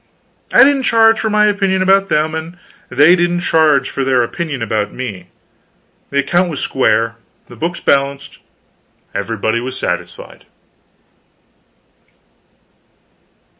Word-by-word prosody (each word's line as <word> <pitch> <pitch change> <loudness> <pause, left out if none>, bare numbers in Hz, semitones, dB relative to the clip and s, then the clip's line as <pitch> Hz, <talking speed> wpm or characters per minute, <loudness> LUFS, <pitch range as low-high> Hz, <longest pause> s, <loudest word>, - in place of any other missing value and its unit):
I - - +7
didn't 275 0 +3
charge 225 -2 +3
for 220 - -1
my 210 0 +3
opinion 195 -2 +1
about 195 +1 +3
them, 155 +1 0
and 160 +2 -6 0.3
they 150 +6 +5
didn't 175 0 0
charge 155 -5 +2
for 135 - -3
their 130 -2 +2
opinion 145 0 -4
about 110 -3 -2
me: 110 -8 -7 0.8
the 140 - -4
account 175 +6 +1
was 150 -5 -5
square, 115 -5 0 0.3
the - - -13
books 170 +2 -4
balanced, 140 0 -1 0.7
everybody 110 +2 -2
was 130 +2 -6
satisfied. 90 0 -6
150 Hz, 120 wpm, -15 LUFS, 125-185 Hz, 0.8 s, I